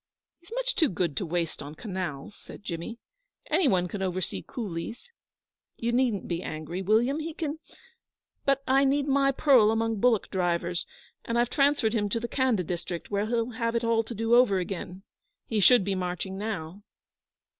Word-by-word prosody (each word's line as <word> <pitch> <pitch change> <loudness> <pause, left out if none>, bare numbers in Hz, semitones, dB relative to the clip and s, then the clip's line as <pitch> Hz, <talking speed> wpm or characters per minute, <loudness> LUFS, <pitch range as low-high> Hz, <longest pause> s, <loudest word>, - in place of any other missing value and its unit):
'He's 345 +5 -21
much - - -1
too 320 - +2
good 170 -5 -1
to 190 - -1
waste 170 -1 -2
on 145 +2 -8
canals,' 185 - -5
said - - -13
Jimmy. 170 +5 -5 0.5
'Any 325 0 +4
one 180 -6 +2
can 195 +2 -5
oversee 185 -1 -2
coolies. 225 - -6 0.7
You 235 +1 -1
needn't 240 -5 +1
be 170 0 -2
angry, 155 +4 -5
William: 230 - +2
he 315 0 -5
can 315 -1 -3 0.8
but 275 0 +2
I 270 +1 +4
need 280 +1 +2
my 275 0 +3
pearl 265 -6 +5
among 225 -1 0
bullock 235 -2 +2
drivers, 175 -1 -1 0.4
and 230 - -1
I've 240 0 +2
transferred 275 -6 +3
him 205 -3 0
to 230 - 0
the 235 - -3
Khanda 250 -7 +1
district, 175 +1 -5
where 205 +1 0
he'll 230 +1 0
have 230 0 -2
it 235 - +1
all 230 -1 +2
to 235 - -7
do 225 +2 0
over 240 -5 +6
again. 185 0 -5 0.4
He 220 - -1
should 205 +3 +6
be 195 +1 -1
marching 180 0 -3
now.' 195 -3 -4
220 Hz, 175 wpm, -28 LUFS, 180-250 Hz, 0.8 s, over